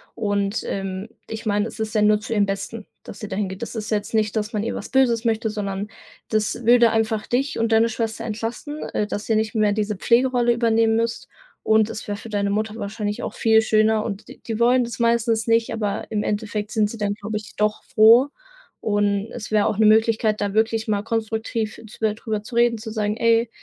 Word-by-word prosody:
und, 205 -1 -1
ähm, 195 +1 -4 0.2
ich 220 +1 -6
meine, 205 -1 +1
es - - -10
ist 220 0 -3
ja 215 - +3
nur 210 0 +4
zu 220 +2 -5
ihrem 205 -2 +3
Besten, 200 +2 -5 0.2
dass 200 - -10
sie 210 - -6
da 190 - -4
hingeht. 190 -2 -3
Das 235 - -5
ist 215 0 -4
ja 215 - +2
jetzt 205 - -7
nicht, 215 -1 +1
dass 215 0 -1
man 210 -3 -2
ihr 230 - -3
was - - -6
Böses 245 -4 +2
möchte, 225 -1 0
sondern 200 -1 -3 0.4
das 215 +2 -1
würde 235 -1 +6
einfach 220 -1 0
dich 270 +4 -1
und 230 0 0
deine 225 +1 +5
Schwester 225 0 -3
entlasten, 230 +7 -5
äh, 210 - -1
dass 205 +2 -5
ihr 220 - +3
nicht 220 +1 -1
mehr 215 -1 +3
diese 210 0 -1
Pflegerolle 240 +3 +2
übernehmen 230 -1 +2
müsst, 230 0 -2 0.3
und 220 0 +3
es 215 - -7
wäre 205 - -2
für 225 - -10
deine 200 -1 0
Mutter 215 +1 -1
wahrscheinlich 210 -1 -4
auch - - -4
viel 220 -1 +4
schöner 215 0 +3
und 205 -2 -5
d - - -12
die 225 -1 -3
wollen 245 +2 +4
das 235 0 -6
meistens 230 -1 +1
nicht, 230 0 +2
aber 210 -3 -2
im 210 -1 0
Endeffekt 210 0 -2
sind 215 -2 +1
sie 230 - -7
dann, 205 -2 -1
glaube 215 +1 -4
ich, 210 - -10
doch 210 0 0
froh. 230 +5 +6 0.5
Und 205 0 0
es 235 -3 -7
wäre 210 -1 +2
auch - - -1
'ne 220 - +5
Möglichkeit, 220 0 +3
da 200 -1 -1
wirklich 220 +1 +1
mal 205 -1 +1
konstruktiv 220 0 -3
zu - - -14
drüber 215 -1 -4
zu 225 - -11
reden, 235 0 +3
zu 220 0 -7
sagen: 210 -1 -1
„Ey, 230 0 +3
220 Hz, 225 wpm, -22 LUFS, 210-230 Hz, 0.5 s, würde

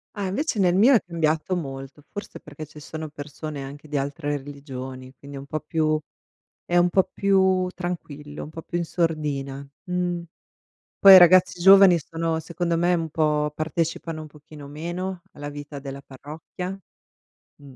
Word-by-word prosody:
Ah, 200 -2 -2
invece 250 - -1
nel 180 -1 +3
mio 240 +8 +6
è 230 - +6
cambiato 165 +1 0
molto, 135 -2 -6
forse 205 0 -8
perché 150 +1 -9
ci 150 +1 -14
sono 155 +1 -7
persone 145 0 -7
anche 145 +3 -10
di 145 -1 -2
altre 145 +1 -2
religioni, 130 -2 -8
quindi 140 +3 -10
è - - -5
un 135 - -9
po' 155 +2 -3
più 155 0 0 0.7
è 175 - -1
un 175 0 +4
po' 190 +1 +2
più 190 -2 +3
tranquillo, 150 -5 -6
un 150 - -10
po' 165 - -8
più 175 - -5
in 170 - -1
sordina, 145 -5 -2 0.2
mh. 180 -1 -1 0.8
Poi 195 -1 +10
i - - +13
ragazzi 180 0 +6
giovani 195 -1 +8
sono 165 +1 -2
secondo 170 +1 -2
me 175 +1 +2
un 165 -2 0
po' 150 -1 +1
partecipano 160 +1 -2
un 155 - -9
pochino 150 -1 -13
meno 175 +5 -5
alla 145 0 -8
vita 145 0 -8
della 140 0 -8
parrocchia, 160 +7 -8 0.8
mh. 140 -2 -14
155 Hz, 170 wpm, -24 LUFS, 145-175 Hz, 0.8 s, i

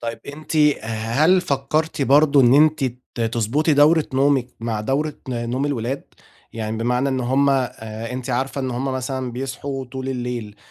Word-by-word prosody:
طيب 115 0 -4
أنتِ 155 +2 -6 0.3
هل 115 +12 +2
فكرتِ 145 +1 -1
برضه 140 +1 +5
إن 120 0 +5
أنتِ 155 -1 +4 0.3
ت - - -6
تضبُطي 115 +7 +1
دورة 150 +2 +5
نومِك 135 -2 +3
مع 115 -2 -2
دورة 140 +7 -1
نوم 120 +3 -2
الولاد، 135 -1 -3 0.5
يعني 110 -1 -4
بمعنى 125 +4 0
إن 130 -1 -1
هُم 135 +3 +2
آآ 115 -3 -3
أنتِ 130 0 -5
عارفة 130 +3 -1
إن 130 -1 -2
هُم 125 +2 -3
مثلًا 130 -1 -3
بيصحوا 135 +1 -4
طول 130 +1 -6
الليل 120 -5 -4
130 Hz, 155 wpm, -21 LUFS, 120-140 Hz, 0.5 s, برضه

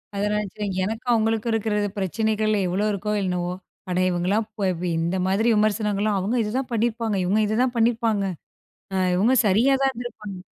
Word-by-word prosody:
அதனால 210 +1 0 0.2
சரி 210 -1 -3 0.2
எனக்கும் 225 +5 -2
அவங்களுக்கும் 225 0 +1
இருக்கிறது 210 -2 0
பிரச்சனைகள் 215 +2 0
எவ்வளோ 190 +4 0
இருக்கோ 205 +1 -3
என்னவோ, 180 -1 -1 0.4
அட 180 - -1
இவுங்கலாம் 185 +5 0
போய் 190 -2 +1
போய், 175 -1 -1
இந்த 170 +3 -1
மாதிரி 200 +5 +1
விமர்சனங்கள்லாம், 210 -1 +1
"அவுங்க 215 +7 -1
இதுதான் 250 +5 -2
பண்ணிருப்பாங்க. 230 -1 0
இவுங்க 205 +4 +2
இததான் 245 +4 +1
பண்ணிருப்பாங்க. 225 -3 +2 0.7
அ - - 0 0.2
இவுங்க 225 +8 +3
சரியா 225 +8 +4
தான் 270 - +3
இருந்துருப்பாங்க." 230 -5 -7
210 Hz, 155 wpm, -24 LUFS, 195-225 Hz, 0.7 s, சரியா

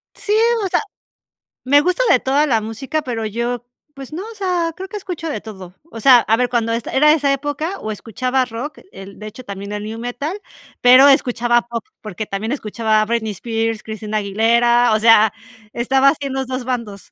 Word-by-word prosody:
Sí, 415 - -2 0.3
o - - +1
sea, - - +1 0.8
me 285 +3 +5
gusta 365 +9 +1
de 255 - +5
toda 275 +4 +2
la 230 -5 +2
música, 245 +8 -4
pero 235 -5 -4
yo, 235 +3 -3 0.3
pues 275 +1 -10
no, 350 +5 -5
o - - -13
sea, 360 -4 -1
creo 380 +2 -7
que 420 - -5
escucho 355 -5 -6
de 295 - -4
todo. 190 -4 -11 0.2
O 225 - -8
sea, 250 +2 +7
a 225 -1 +2
ver, 250 0 +1
cuando 230 -2 0
esta 230 -1 -4
era 300 +3 +5
esa 290 -3 +1
época 290 +6 -3
o 215 - -5
escuchaba 255 +5 -1
rock, 250 +5 -7
el, 195 0 -11
de 215 - -7
hecho, 220 +4 -10
también 200 -1 -7
el 210 0 -4
new 220 +2 -6
metal, 260 - -4 0.4
pero 255 +3 +8
escuchaba 240 -3 +3
pop, 235 -2 -6 0.2
porque 215 0 -6
también 210 +3 -4
escuchaba 220 -4 0
a - - +1
Britney 225 -1 -1
Spears, 225 +2 -3
Christina 215 -1 -4
Aguilera, 235 +3 +3
o 215 - +2
sea, 220 -1 +5 0.4
estaba 265 +3 +3
haciendo 275 -2 -2
2 255 0 -4
bandos. 235 -6 -5
240 Hz, 195 wpm, -19 LUFS, 220-275 Hz, 0.8 s, pero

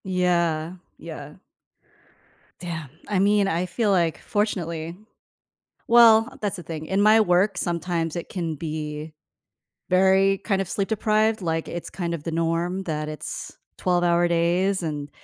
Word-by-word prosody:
Yeah, 175 -3 0 0.2
yeah. 150 -3 -9 1.2
Damn, 165 -5 -6 0.2
I 205 -3 0
mean, 200 0 +3
I 175 -1 0
feel 205 +4 0
like, 170 -5 +1
fortunately 170 -5 -2 0.9
well, 230 +1 +6
that's 205 -2 -1
the 175 - -9
thing, 160 -1 -6
in 190 - 0
my 215 +2 +6
work, 185 0 +2
sometimes 170 -1 -2
it 170 - -5
can 170 -4 -3
be 155 0 -5 0.8
very 190 +1 +4
kinda 195 -2 -1
sleep 195 +2 -2
deprived, 215 0 +1
like, 165 -2 -2
it's 175 - -6
kind 170 -2 -4
of 160 -3 -5
the 165 - -4
norm 165 +3 -1
that 155 -3 -3
it's 155 0 -7 0.2
12 180 -1 +1
hour 175 0 +3
days, 175 +3 +1
and 150 -2 -4
175 Hz, 140 wpm, -24 LUFS, 165-195 Hz, 1.2 s, well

